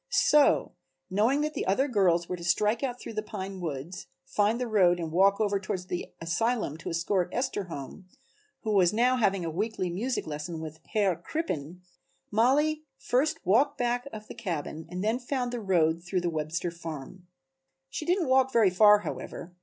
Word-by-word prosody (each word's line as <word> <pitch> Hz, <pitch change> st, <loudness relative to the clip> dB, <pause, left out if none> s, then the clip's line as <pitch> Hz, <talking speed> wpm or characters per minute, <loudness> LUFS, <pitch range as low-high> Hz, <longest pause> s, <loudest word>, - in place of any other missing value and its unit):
So, 300 Hz, -9 st, +4 dB, 0.4 s
knowing 230 Hz, +9 st, +2 dB
that 305 Hz, +1 st, -1 dB
the -, -, -3 dB
other 230 Hz, +9 st, +2 dB
girls 180 Hz, -8 st, +2 dB
were 180 Hz, -, -3 dB
to 170 Hz, -, -10 dB
strike 210 Hz, +6 st, +2 dB
out 250 Hz, -2 st, -2 dB
through -, -, -8 dB
the 215 Hz, -, -2 dB
pine 195 Hz, -3 st, -6 dB
woods, 165 Hz, +3 st, -5 dB, 0.2 s
find 205 Hz, -, +1 dB
the 250 Hz, -, -1 dB
road 185 Hz, -6 st, +3 dB
and 165 Hz, -2 st, -4 dB
walk 195 Hz, +4 st, +4 dB
over 205 Hz, -2 st, +1 dB
toward 185 Hz, -1 st, -4 dB
the 175 Hz, -, -4 dB
asylum 175 Hz, -, -1 dB
to 165 Hz, -, -6 dB
escort 175 Hz, +2 st, 0 dB
Esther 250 Hz, -6 st, -2 dB
home 165 Hz, +3 st, -8 dB, 0.5 s
(who 220 Hz, -, -2 dB
was 185 Hz, -4 st, +4 dB
now 245 Hz, +4 st, +3 dB
having 195 Hz, -6 st, +1 dB
a 165 Hz, -, -2 dB
weekly 190 Hz, 0 st, -2 dB
music 240 Hz, +9 st, -2 dB
lesson 155 Hz, +2 st, -5 dB
with 160 Hz, 0 st, -7 dB
Herr 200 Hz, -5 st, +2 dB
Crippen), 180 Hz, -, -4 dB, 0.5 s
Mollie 285 Hz, +8 st, +3 dB, 0.2 s
first 310 Hz, +6 st, 0 dB
walked 240 Hz, +10 st, +3 dB
back 245 Hz, +1 st, -1 dB
of 215 Hz, -1 st, -8 dB
the -, -, -8 dB
cabin 160 Hz, -6 st, -5 dB
and 180 Hz, +2 st, -4 dB
then 225 Hz, +3 st, +1 dB
found 250 Hz, -1 st, -2 dB
the 240 Hz, -, -3 dB
road 170 Hz, -4 st, +2 dB
through 180 Hz, +1 st, -1 dB
the 175 Hz, -1 st, -1 dB
Webster 160 Hz, +2 st, -2 dB
farm. 170 Hz, +1 st, -8 dB, 0.6 s
She -, -, -4 dB
didn't 350 Hz, 0 st, +1 dB
walk 265 Hz, 0 st, +4 dB
very 225 Hz, -6 st, +4 dB
far 210 Hz, +2 st, +6 dB
however. 175 Hz, -3 st, -6 dB
195 Hz, 185 wpm, -28 LUFS, 170-240 Hz, 0.6 s, far